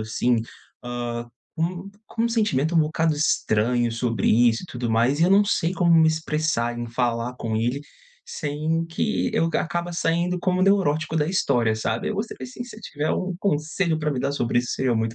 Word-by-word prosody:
assim, 115 +3 +1 0.5
hã, 120 -1 -4 0.3
com 180 +4 -3 0.2
com 225 - -3
um 235 - +2
sentimento 175 - +1
um 165 - +5
bocado 160 0 +1
estranho 120 -4 +1
sobre 115 -3 -1
isso 115 +5 +3
e - - -11
tudo 120 -6 -4
mais. 120 +7 +2
E - - +6
eu 180 - +3
não 200 +1 +6
sei 175 -3 0
como 175 -3 +3
me 160 -1 +6
expressar, 155 -7 -1
em 120 - -4
falar 120 0 -1
com 110 -1 -2
ele, 120 +5 0 0.4
sem 155 +2 -2
que 170 +6 -1
eu - - +3
aca 165 - 0
acaba 175 0 -3
saindo 170 +2 0
como 185 0 +1
neurótico 160 -6 +2
da 150 -1 +2
história, 125 -11 +1
sabe. 110 +1 -2
Eu 215 - -2
gostaria, 215 +3 -4
assim, 250 -1 -7
se 245 - -12
você 215 - -11
tiver 150 -6 -3
um 185 -1 -2
conselho 160 -1 0
para 150 -1 -1
me 130 - -3
dar 140 +1 -1
sobre 120 -3 0
isso, 120 - -4
seria 130 -2 0
muito 110 0 -1
150 Hz, 200 wpm, -24 LUFS, 120-175 Hz, 0.5 s, E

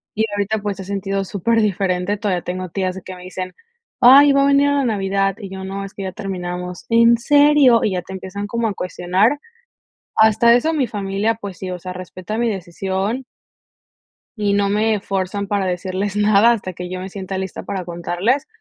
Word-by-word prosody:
Y 220 +1 +2
ahorita, 205 +2 -1
pues, 205 -1 -4
he - - -5
sentido 195 0 -2
super 225 +5 +1
diferente. 195 -1 0
Todavía 200 -4 -1
tengo 185 +1 -4
tías, 185 +1 -2
que 185 - -8
me 180 - -12
dicen: 185 0 -6 0.4
"Ay, 280 +4 +8
va 275 0 +4
a - - +4
venir 280 0 +4
a 285 - +2
la 280 -2 +1
Navidad", 195 -3 0
y 200 -3 -7
yo: 190 0 -7
"No, 195 +1 -5
es 195 - -11
que 200 - -6
ya 190 - -3
terminamos. 180 -2 -5
'¿En 230 0 +5
serio?'" 285 -1 +5
Y 210 - +1
ya 180 -1 -2
te 190 - -9
empiezan 190 +2 -6
como 230 +2 -1
a 210 - -2
cuestionar. 185 +9 0 0.8
Hasta 220 +2 +5
eso, 315 +7 +2
mi 280 -5 +1
familia, 205 0 -1
pues 200 -4 -7
sí, 185 - -6
o 180 - -4
sea, 185 +1 -7
respeta 185 +3 -6
mi 235 0 +1
decisión 195 +5 -3 1.1
y 205 -1 +1
no 200 0 +2
me 210 +1 +1
fuerzan 195 +1 -2
para 200 -1 0
decirles 185 +2 -2
nada, 210 +2 +5
hasta 195 -5 -4
que 180 +1 -7
yo 185 0 -4
me 185 - -6
sienta 190 0 -5
lista 190 -1 -5
para 185 -3 -5
contarles. 175 +9 -1
200 Hz, 200 wpm, -20 LUFS, 185-220 Hz, 1.1 s, Ay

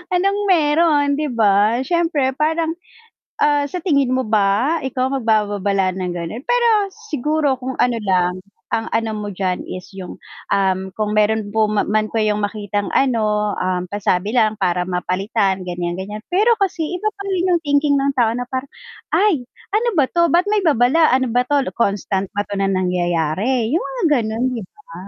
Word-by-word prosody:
anong 395 +3 +1
meron 305 -2 +3
'di 305 - -1
ba? 210 +1 +3
Syempre 325 -4 +1
parang, 320 +1 0 0.7
ah, 290 -1 +3
sa 360 - -3
tingin 280 -8 +2
mo 260 - +1
ba 215 +9 +2
ikaw 260 0 -1
magbababalala 205 -6 0
ng 180 -1 -3
gano'n? 175 +8 -5
Pero 485 -1 +3 0.4
siguro 300 0 +1
kung 260 +1 -3
ano 245 -2 +1
lang, 180 -2 +1 0.4
ang 225 0 -2
ano 225 -1 -1
mo 210 -1 -5
d'yan 185 -1 -2
is 185 0 -7
yung, 190 -2 -8 0.3
um, 190 -1 +1
kung 210 0 -1
meron 215 0 +1
po 220 -1 +3
man 215 +1 0
kayong 210 -2 0
makitang 205 -1 -3
ano, 215 -5 +1
um, 185 -1 -1
pasabi 205 +1 -1
lang 215 -3 +2
para 180 -3 +1
mapalitan 190 +2 -1
ganyan 175 -1 -3
ganyan, 205 +3 -5
pero 425 +6 +4
kasi 385 -5 -1 0.2
iba 430 - -5
pa 400 - -8
rin 370 -1 0
yung 340 - 0
thinking 285 -1 +2
ng 275 +1 +1
tao 230 -2 +4
na 245 - -2
parang, 260 +1 -3 0.5
"Ay 350 -12 +2 0.3
ano 460 +3 +2
ba 280 - +5
'to? 340 0 +3
Ba't 350 +3 +3
may 420 -1 +2
babala? 300 +2 +4
Ano 260 -2 +1
ba 245 +2 +1
'to 285 +1 +2
lo - - -2
constant 200 -3 0
ba 205 - 0
'to 200 - -4
na 195 - +1
nangyayari?" 180 +5 0
Yung 340 - +1
mga 270 -2 -5 0.2
ganun 220 +2 -2
'di 230 - -4
ba? 280 -12 -17
225 Hz, 175 wpm, -19 LUFS, 200-290 Hz, 0.7 s, ba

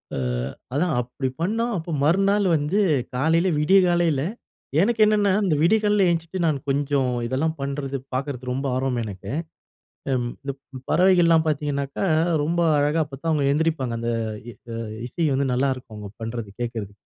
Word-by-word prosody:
அ, - - -3 0.6
அதான் 160 +4 +1
அப்டி 125 +2 -4
பண்ணா 220 +7 0
அப்ப 165 0 -5
மறுநாள் 195 +6 +3
வந்து 155 +8 0 0.4
காலையில 160 +7 +2
விடியகாலையில 175 -3 +3 0.6
எனக்கு 225 +2 +2
என்னென்னா, 210 -2 +3
இந்த 160 -5 +2
விடியகாலைல 210 +2 +3
எழுந்திட்டு 165 +2 -3
நான் 155 -3 +2
கொஞ்சம் 140 -2 +1
இதெல்லா 130 +6 0
பண்றது, 140 0 -3 0.2
பார்க்குறது 130 -1 -3
ரொம்ப 135 +2 -2
ஆர்வம் 130 -1 -1
எனக்கு. 100 -1 -7 0.8
அம் 125 -2 0 0.2
ப் 140 0 -3 0.3
பறவைகள்லாம் 175 -3 +4
பாத்தீங்கனால், 145 +1 -1 0.4
ரொம்ப 170 +3 0 0.2
அழகா 150 +3 +2
அப்பத்தான் 145 +3 -5
அவங்க 150 -2 +1
எந்திரிப்பாங்க. 150 -5 0
அந்த 115 0 -1 0.4
இ - - -7 0.2
அ, - - -4 0.3
இசை 165 +6 -1
வந்து 135 +1 +1
நல்லாருக்கும், 130 -3 -1
அவங்க 105 -1 -8
பண்றது, 115 -2 -5
கேட்கறது. 115 -4 -4
145 Hz, 140 wpm, -23 LUFS, 130-170 Hz, 0.8 s, பறவைகள்லாம்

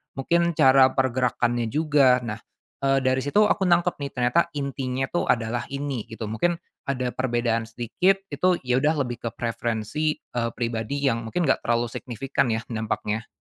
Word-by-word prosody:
mungkin 170 +4 +1
cara 135 -3 +6
pergerakannya 120 -2 +1
juga. 140 -2 +3
Nah, 110 -1 -4 0.5
eee, 135 -1 +2
dari 130 0 +2
situ 145 +11 +3
aku 195 -2 +2
nangkep 175 -1 +2
nih, 140 -1 -4
ternyata 125 +7 +2
intinya 135 -2 -2
itu 175 - -1
adalah 120 0 0
ini, 140 -4 -4
gitu. 110 0 -7
Mungkin 170 +10 +1 0.3
ada 130 -2 -1
perbedaan 120 -3 0
sedikit 180 - 0
itu 180 -1 +1
ya 125 -1 +1
udah 150 +3 +2
lebih 120 -1 -5
ke - - 0
preferensi, 120 +6 -2
eee, 115 -1 -4
pribadi 115 +4 -3
yang 115 -4 +2
mungkin 175 +10 -1
nggak 135 - +2
terlalu 120 0 +1
signifikan 130 +1 -2
ya 115 0 -1
dampaknya. 110 0 -2
130 Hz, 160 wpm, -24 LUFS, 115-145 Hz, 0.5 s, cara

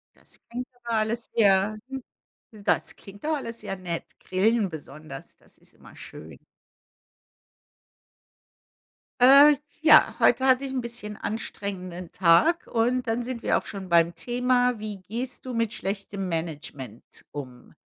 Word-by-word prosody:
Das - - -16
klingt 250 +2 -4 0.2
aber 235 -1 -2
alles 220 +2 -1
sehr 205 -1 +3
hm, 265 -1 -6 0.5
das 210 -3 -1
klingt 200 +4 -14
doch 310 +1 0
alles 235 -5 -6
sehr 195 - -4
nett. 175 -3 -4 0.2
Grillen 205 +2 +1
besonders, 155 -1 -10
das - - -26
ist - - -21
immer - - -17
schön. - - -11 2.8
Äh, 280 +4 +8 0.3
ja, 310 -1 +6
heute 260 - +4
hatte 260 +1 +4
ich 270 - -4
'n 260 - -1
bisschen 235 -3 -6
anstrengenden 190 -5 -5
Tag 195 - +3
und 245 +2 0
dann 230 +1 0
sind 240 -1 -5
wir - - +3
auch - - -9
schon 195 -2 -7
beim 170 0 +4
Thema. 245 +5 +1
Wie 210 -3 -6
gehst 245 +7 -6
du 255 - -4
mit 230 -1 0
schlechtem 195 -2 -4
Management 150 -8 -6
um? 130 -4 -9
215 Hz, 140 wpm, -26 LUFS, 185-245 Hz, 2.8 s, Äh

